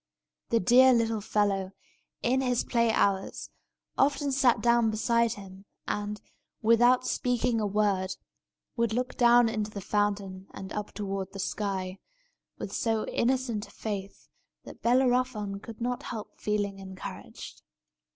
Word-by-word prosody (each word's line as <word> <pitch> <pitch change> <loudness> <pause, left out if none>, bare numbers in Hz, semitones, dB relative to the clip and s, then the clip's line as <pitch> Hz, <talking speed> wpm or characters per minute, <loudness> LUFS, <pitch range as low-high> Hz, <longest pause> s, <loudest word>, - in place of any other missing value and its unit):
The 230 - +3
dear 255 +6 +6
little 225 -2 +1
fellow, 195 -2 0 0.5
in 260 +3 +2
his 250 -2 +1
play 235 -2 +2
hours, 195 -3 0 0.5
often 285 0 +2
sat 260 -2 +3
down 235 -1 +3
beside 230 +1 +1
him, 195 -1 -12 0.2
and, 210 0 -3 0.4
without 240 +3 +5
speaking 245 -2 0
a 210 - 0
word, 195 -2 0 0.6
would 235 -2 0
look 250 +3 -2
down 240 -1 +6
into 215 -1 -2
the 210 - -7
fountain 200 -1 -1
and 190 +1 -7
up 210 0 -4
toward 195 -2 -4
the 195 - -7
sky, 190 -1 -3 0.6
with - - -6
so 225 -2 0
innocent 240 -3 0
a - - -17
faith 200 -3 -6 0.4
that - - -12
Bellerophon 245 -5 +1
could 225 +1 -10
not 245 +1 -2
help 215 -2 -7
feeling 205 -2 -1
encouraged. 190 -1 -9
215 Hz, 135 wpm, -28 LUFS, 200-240 Hz, 0.6 s, dear